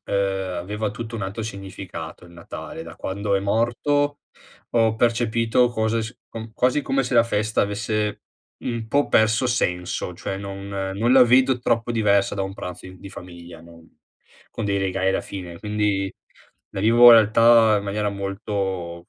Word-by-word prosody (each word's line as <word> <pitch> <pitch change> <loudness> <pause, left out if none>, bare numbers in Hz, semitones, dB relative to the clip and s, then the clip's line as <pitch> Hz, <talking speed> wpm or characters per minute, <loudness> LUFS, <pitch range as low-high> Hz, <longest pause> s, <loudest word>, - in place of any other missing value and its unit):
ehm, 95 -2 -1
aveva 105 +4 -3
tutto 115 0 -7
un 115 - -4
altro 95 +4 -4
significato 95 -6 -8
il 85 - -15
Natale. 85 -1 -8
Da 85 0 -11
quando 100 +1 -2
è 95 - +2
morto, 130 +8 0 0.5
ho 115 -2 +2
percepito 115 +1 +2
cose 110 -1 -1
s 115 +3 -8
com 110 0 -8
quasi 125 +5 +2
come 135 -1 0
se 125 - -5
la 115 - +6
festa 110 -1 -1
avesse 105 +1 -2 0.4
un 115 -2 -4
po' 145 +3 +1
perso 110 +3 +3
senso, 90 -6 -2
cioè 95 +2 -5
non 100 0 -7
non 100 +4 -1
la 130 -1 +8
vedo 125 +1 +4
troppo 120 0 0
diversa 100 -3 +2
da 100 - -4
un 95 0 -5
pranzo 90 -2 -8
in 95 0 -12
di 100 +1 -11
famiglia, 85 -2 -11
non 85 0 -16 0.6
con 115 - -5
dei 100 -1 0
regali 95 0 -1
alla - - 0
fine, 90 -3 -8
quindi 105 -2 -1 0.6
la - - -5
vivo 120 +3 +7
in - - +11
realtà 115 0 +6
in 100 - -3
maniera 105 +1 -1
molto 95 -3 -4
105 Hz, 170 wpm, -23 LUFS, 95-115 Hz, 0.6 s, in